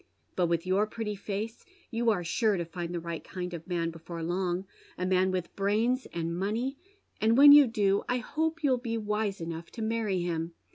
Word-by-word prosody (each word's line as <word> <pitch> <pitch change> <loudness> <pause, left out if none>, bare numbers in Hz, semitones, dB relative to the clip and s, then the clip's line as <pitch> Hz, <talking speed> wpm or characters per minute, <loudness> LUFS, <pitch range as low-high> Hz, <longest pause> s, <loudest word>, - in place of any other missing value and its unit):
But 180 -2 +2
with 170 0 0
your 195 +3 +2
pretty 215 -1 -4
face 205 +3 -5 0.3
you 235 0 +1
are 200 -5 +1
sure 210 +4 +1
to 170 - -2
find 170 +1 -5
the 175 - -2
right 170 -1 -5
kind 180 -1 -5
of 170 0 -7
man 170 -2 -1
before 165 0 -7
long, 180 +2 -1 0.3
a 180 - -2
man 185 0 +3
with 185 -2 -3
brains 220 +6 +1
and 170 0 -3
money, 225 +9 -2 0.4
and 225 +2 +4
when 285 +1 +10
you 290 -2 +9
do 205 -3 +2
I 250 - +2
hope 320 +6 -2
you'll 260 -3 +3
be 230 -2 -3
wise 210 -2 -1
enough 165 0 -6
to 225 - -4
many 220 -5 0
him. 165 -1 -3
195 Hz, 200 wpm, -29 LUFS, 175-230 Hz, 0.4 s, when